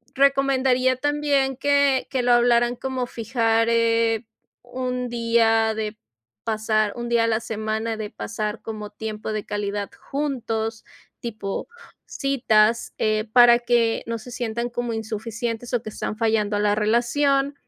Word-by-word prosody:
Recomendaría 265 -2 +3
también 285 -1 +1
que 280 -1 +2
que 260 -2 0
lo 245 0 +3
hablaran 240 0 +3
como 260 0 -3
fijar, 230 -1 0
eh, 230 0 +2 0.4
un 250 0 -3
día 230 -1 +2
de 215 0 -4 0.5
pasar 215 -1 0
un 240 0 -4
día 235 -1 +3
a - - +3
la 225 -1 +1
semana 220 0 -3
de 215 -1 -5
pasar 215 0 -4
como 215 -2 -6
tiempo 215 0 -5
de 215 -1 -3
calidad 205 -1 -3 0.2
juntos, 230 -6 -2 0.4
tipo 210 -4 -5 0.4
citas, 235 -5 +1
eh, 215 0 0
para 240 -1 +7
que 240 -1 +1
no 230 0 -3
se 235 +3 -11
sientan 235 0 -3
como 240 -1 -3
insuficientes 225 +2 -4
o 240 - +1
que 215 - -6
están 215 - -4
fallando 220 -2 +1
a - - 0
la 205 0 +2
relación, 275 +6 +1
230 Hz, 145 wpm, -23 LUFS, 220-250 Hz, 0.5 s, para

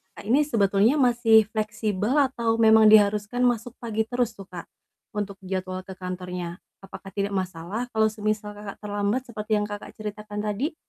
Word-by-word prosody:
Kakak - - -10
ini 255 +8 +4
sebetulnya 215 -3 +3
masih 235 -4 +5
fleksibel 215 +2 -1
atau 235 -5 +1
memang 220 -1 +6
diharuskan 210 +3 +4
masuk 240 0 -1
pagi 220 -2 -2
terus 245 -2 0
tuh 195 -2 -12
Kak, 175 -2 -8 0.5
untuk 205 -2 -4
jadwal 185 0 -4
ke 190 - -8
kantornya? 180 -1 -6 0.2
Apakah 195 0 -10
tidak 200 0 -2
masalah 185 +4 -3
kalau 220 -1 +3
semisal, 215 -1 -2
Kakak 205 -1 -8
terlambat 205 +3 -1
seperti 215 -1 -7
yang 210 - 0
Kakak 205 0 -7
ceritakan 210 -1 -6
tadi? 215 - -2
210 Hz, 160 wpm, -25 LUFS, 200-225 Hz, 0.5 s, memang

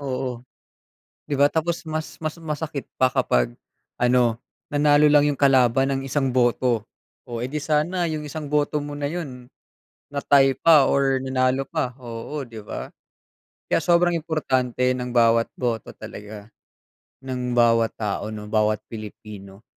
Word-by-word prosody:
Oo. 130 -3 -4 0.9
'Di 145 - -1
ba, 140 - +6
tapos 165 +1 -1
mas 155 0 -5
mas 155 +1 -3
masakit 150 -3 -4
pa 130 0 +4
kapag - - +1 0.5
ano, 120 -2 +3 0.3
nanalo 145 0 +4
lang 145 0 +5
'yung 145 - -2
kalaban 135 -1 +4
ng 135 - -2
isang 135 -1 0
boto. 120 -2 +2 0.4
Oh, 120 -1 -4
eh, - - -1
di 150 +1 -3
sana 165 +4 0
'yung 155 -1 -4
isang 150 0 -6
boto 150 0 +1
mo 145 0 -6
na 145 - -2
'yun 140 -6 -6 0.6
na-tie 140 -1 +3
pa 155 -5 +6
or 135 -1 +2
nanalo 130 0 0
pa, 145 -7 -2
oo, 120 +5 -6
'di 115 -2 -9
ba? - - -6 0.8
Kaya - - +2
sobrang 175 +1 +3
importante 130 -6 0
ng 125 -1 -4
bawat 115 -1 +4
boto 115 -4 -2
talaga, 105 0 -10 0.7
ng 125 -2 -3
bawat 115 -1 +4
tao, 105 0 -3
'no, 105 -1 -7
bawat 110 -1 +1
Pilipino. 105 -2 -10
130 Hz, 145 wpm, -23 LUFS, 115-150 Hz, 0.9 s, ba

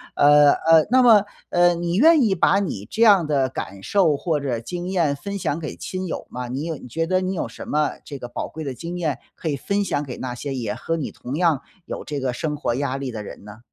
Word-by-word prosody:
呃， 145 0 +6
呃， 160 -1 +4
那 255 +1 +6
么， 225 -5 +7 0.3
呃， 175 0 +4
你 170 +1 -2
愿 310 - +6
意 200 -4 +2
把 195 +3 +3
你 135 - -3
这 225 - +1
样 200 -6 +6
的 140 -3 +1
感 100 -6 -6
受 175 -8 +2
或 160 0 -1
者 130 -5 -2
经 175 +9 -5
验 170 -7 +1
分 200 +7 -5
享 165 -3 -2
给 155 - -6
亲 185 0 -5
友 - - -5
吗？ 125 0 -5
你 130 +4 -4
有 165 -2 -3
觉 165 +7 -2
得 185 +2 +1
你 185 +1 -2
有 - - -2
什 - - -10
么 150 0 +1
这 145 - -8
个 125 - -7
宝 120 - -5
贵 160 - -8
的 135 -3 -4
经 170 +6 -6
验 160 -5 -2 0.2
可 165 - -6
以 145 - 0
分 200 +8 -1
享 145 - -1
给 130 -4 -7
那 125 -1 -4
些 135 +2 -5
也 115 -5 -3
和 165 0 -3
你 150 - -4
同 130 +4 -6
样 160 -5 +2 0.2
有 - - -6
这 145 -2 -4
个 130 -2 -1
生 150 +4 -3
活 120 - -1
压 135 0 -1
力 135 -2 -4
的 105 -2 -6
人 - - -10
呢？ 105 +2 -11
155 Hz, 270 characters per minute, -22 LUFS, 135-180 Hz, 0.3 s, 么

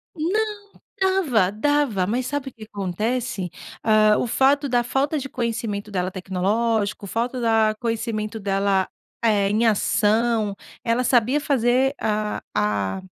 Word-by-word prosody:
Não. 420 +7 0 0.5
Dava, 310 - +2
dava. 230 -3 +1
Mas, 245 +5 -1
sabe 285 -1 -3
o - - -28
que 220 -2 -11
acontece? 210 +1 -3 0.3
Hã, 215 -1 +4
o - - 0
fato 275 +4 +2
da 245 -1 +2
falta 280 +5 0
de 275 -1 -6
conhecimento 225 -4 -3
dela 185 -2 -1
tecnológico. 200 +3 -1
Falta 240 +5 -2
da 225 -2 +3
conhecimento 225 -2 -2
dela, 195 -1 +1 0.4
eh, 205 -3 +3
em 215 +3 +2
ação. 220 0 +2 0.3
Ela 235 +2 +1
sabia 250 +3 +3
fazer 265 -1 +2
a 215 -1 -1
a 105 - 0
225 Hz, 130 wpm, -23 LUFS, 205-255 Hz, 0.5 s, Hã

